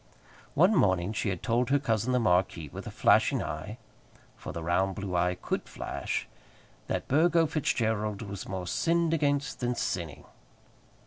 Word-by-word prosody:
One 180 +9 +5
morning 95 - +2
she 105 - -1
had 90 -3 -4
told 120 +1 +1
her 140 - +4
cousin 115 -3 0
the 125 - +3
marquis, 90 - +1
with - - -8
a - - -3
flashing - - +3
eye, 105 - -5 0.6
for - - -8
the 85 - -6
round 95 +3 +1
blue 100 -3 -4
eye 90 +1 +2
could - - -4
flash, - - -4 0.6
that - - -2
Burgo 165 +4 +4
Fitzgerald 110 -8 -1
was 100 -2 -7
more 95 -1 -4
sinned 165 - +1
against 145 -3 0
than 125 0 -1
sinning. 85 -9 -3
110 Hz, 155 wpm, -29 LUFS, 95-140 Hz, 0.6 s, One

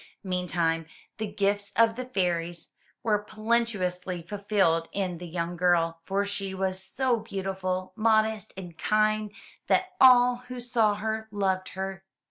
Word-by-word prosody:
Meantime, 175 -3 0 0.3
the 215 - -1
gifts 200 0 0
of 225 0 +4
the 255 +1 -4
fairies 175 -7 -2 0.3
were 215 -3 +2
plenteously 210 -5 -1
fulfilled 195 -4 +1
in 185 -4 -2
the 175 - -7
young 170 +1 -3
girl, 170 -1 +2
for 200 +1 0
she 195 -1 -4
was 190 0 -1
so 255 +4 +1
beautiful, 190 -3 -3
modest 220 -1 +2
and 175 -3 -9
kind 215 0 +2 0.4
that 370 0 +2
all 250 -1 +7
who 250 0 -6
saw 230 -4 +2
her 220 +1 -3
loved 190 -2 0
her. 190 0 -4
200 Hz, 135 wpm, -27 LUFS, 180-220 Hz, 0.4 s, all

